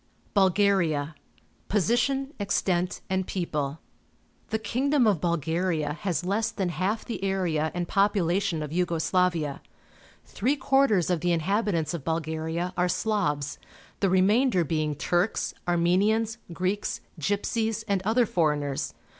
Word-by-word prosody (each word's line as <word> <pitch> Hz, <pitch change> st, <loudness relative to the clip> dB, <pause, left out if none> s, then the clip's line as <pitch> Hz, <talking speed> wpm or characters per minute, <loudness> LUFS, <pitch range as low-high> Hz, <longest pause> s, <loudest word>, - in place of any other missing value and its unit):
BULGARIA 185 Hz, -6 st, +2 dB, 0.2 s
> -, -, -34 dB
' -, -, -37 dB
Position, 265 Hz, -, +1 dB
Extent, 185 Hz, -3 st, 0 dB
and 190 Hz, -1 st, -1 dB
People. 150 Hz, -6 st, -2 dB, 0.4 s
— -, -, -38 dB
The 220 Hz, -, 0 dB
king 240 Hz, +6 st, -1 dB
dom 285 Hz, -4 st, +4 dB
of 200 Hz, -8 st, +2 dB
Bulgaria 165 Hz, -1 st, 0 dB
has 175 Hz, 0 st, -2 dB
less 215 Hz, +4 st, +1 dB
than 195 Hz, -5 st, -2 dB
half 190 Hz, +5 st, -1 dB
the 230 Hz, -, -5 dB
area 175 Hz, -5 st, 0 dB
and 175 Hz, -1 st, -2 dB
population 195 Hz, -4 st, +1 dB
of 150 Hz, -, -6 dB
Yugo 170 Hz, -1 st, 0 dB
Slavia. 170 Hz, -5 st, +1 dB, 0.6 s
Three 260 Hz, +7 st, 0 dB
quarters 260 Hz, -, +2 dB
of 175 Hz, -, +1 dB
the 175 Hz, +2 st, 0 dB
inhabitants 170 Hz, -1 st, 0 dB
of 165 Hz, -5 st, -4 dB
Bulgaria 160 Hz, +2 st, -2 dB
are 180 Hz, 0 st, +1 dB
Slavs, 180 Hz, -8 st, -1 dB, 0.4 s
the 195 Hz, -, +2 dB
remainder 190 Hz, +2 st, +3 dB
being 155 Hz, -1 st, -1 dB
Turks, 175 Hz, +7 st, 0 dB
Armenians, 205 Hz, +7 st, +2 dB
Greeks, 185 Hz, +4 st, -2 dB, 0.2 s
Gypsies, 220 Hz, -, -1 dB
and 200 Hz, -3 st, +1 dB
other 225 Hz, +5 st, +2 dB
foreigners. 150 Hz, -7 st, -1 dB
185 Hz, 135 wpm, -27 LUFS, 165-210 Hz, 0.6 s, dom